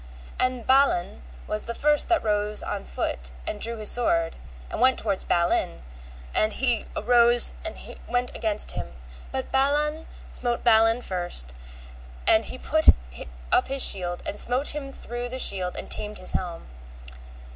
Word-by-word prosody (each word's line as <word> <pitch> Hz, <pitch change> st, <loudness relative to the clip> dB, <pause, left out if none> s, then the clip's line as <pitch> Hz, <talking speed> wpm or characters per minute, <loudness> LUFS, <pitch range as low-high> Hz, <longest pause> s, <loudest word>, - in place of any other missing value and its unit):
And 255 Hz, -2 st, -1 dB
Balan 260 Hz, -, +2 dB, 0.2 s
was 215 Hz, -, -3 dB
the 235 Hz, -, -4 dB
first 300 Hz, +2 st, +2 dB
that 345 Hz, -, +2 dB
rose 210 Hz, -1 st, -1 dB
on -, -, -4 dB
foot 60 Hz, 0 st, -4 dB, 0.2 s
and -, -, -4 dB
drew 230 Hz, 0 st, -1 dB
his 215 Hz, -1 st, +1 dB
sword, 165 Hz, -9 st, +1 dB, 0.4 s
and -, -, -4 dB
went 260 Hz, +1 st, +4 dB
toward 200 Hz, -4 st, 0 dB
Balin, 170 Hz, -, 0 dB, 0.5 s
and 215 Hz, 0 st, +1 dB
he 245 Hz, -3 st, 0 dB
arose 240 Hz, +1 st, +3 dB
and -, -, -6 dB, 0.3 s
went 245 Hz, 0 st, -1 dB
against 215 Hz, -2 st, 0 dB
him; -, -, -6 dB, 0.4 s
but 265 Hz, 0 st, -4 dB
Balan 295 Hz, +4 st, +1 dB, 0.2 s
smote 240 Hz, -1 st, -2 dB
Balin 225 Hz, 0 st, +4 dB
first, 175 Hz, -, -3 dB, 0.7 s
and 220 Hz, 0 st, +5 dB
he -, -, -4 dB
put 315 Hz, +4 st, -1 dB, 0.6 s
up -, -, +3 dB
his 270 Hz, 0 st, +3 dB
shield 175 Hz, -2 st, 0 dB
and 205 Hz, -, 0 dB
smote 255 Hz, +4 st, +2 dB
him 280 Hz, -2 st, -6 dB
through 240 Hz, -2 st, -6 dB
the 255 Hz, -, -5 dB
shield 185 Hz, -7 st, +3 dB
and -, -, -6 dB
tamed 210 Hz, 0 st, -2 dB
his 185 Hz, -, -3 dB
helm. 175 Hz, -2 st, -4 dB
235 Hz, 155 wpm, -25 LUFS, 195-260 Hz, 0.7 s, and